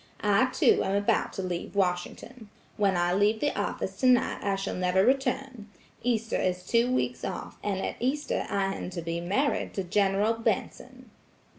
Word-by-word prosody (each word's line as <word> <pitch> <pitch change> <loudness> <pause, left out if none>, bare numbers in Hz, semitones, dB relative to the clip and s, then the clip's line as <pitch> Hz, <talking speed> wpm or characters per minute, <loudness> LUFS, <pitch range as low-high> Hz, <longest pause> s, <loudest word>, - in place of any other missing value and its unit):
I, 205 +3 +4
too, 255 - +3
am 195 - 0
about 205 0 +1
to 190 - -4
leave 180 +1 -4
Washington. 200 +5 -2 0.3
When 195 -3 +2
I 175 0 +1
leave 205 +3 +2
the 290 - 0
office - - -3
tonight 255 -2 +3
I 200 -1 +1
shall 195 0 -3
never 185 +1 +2
return. 260 -3 -1 0.3
Easter 230 -2 0
is 180 0 -1
two 235 +4 +2
weeks 255 - -1
off, - - -5
and 200 -2 -1
at - - -3
Easter 270 +5 -1
I 195 -1 0
am - - -5
to 175 -2 -6
be 165 +1 -3
married 235 +12 0
to 195 - -1
General 200 +4 +2
Benson." 225 0 -3
205 Hz, 170 wpm, -28 LUFS, 185-240 Hz, 0.3 s, I